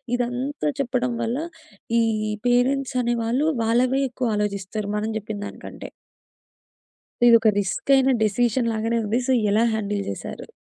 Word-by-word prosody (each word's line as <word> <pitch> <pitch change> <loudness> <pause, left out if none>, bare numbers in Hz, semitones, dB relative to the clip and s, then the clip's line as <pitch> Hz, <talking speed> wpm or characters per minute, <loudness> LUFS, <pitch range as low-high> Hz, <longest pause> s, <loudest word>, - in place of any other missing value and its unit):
ఇదంతా 250 +5 -2
చెప్పడం 250 -1 -1
వల్ల 230 +2 -1 0.6
ఈ - - +3 0.5
పేరెంట్స్ 260 +2 +1
అనే 240 0 +1
వాళ్ళు 250 +7 +1 0.2
వాళ్ళవే 250 +4 +2
ఎక్కువ 250 0 -3
ఆలోచిస్తారు. 205 0 -3
మనం 215 +1 -2
చెప్పిన 215 0 -6
దానికంటే. - - -9 1.4
ఇదొకరిస్కయిన 230 +4 +4
డెసిషన్ 230 +3 +1
లాగానే 225 +2 0
ఉంది. 220 +4 0
సో, - - +2 0.2
ఎలా 215 +3 +3
హ్యాండిల్ 205 -2 -2
జేశారు? 100 - -7
235 Hz, 120 wpm, -23 LUFS, 215-255 Hz, 1.4 s, ఇదొకరిస్కయిన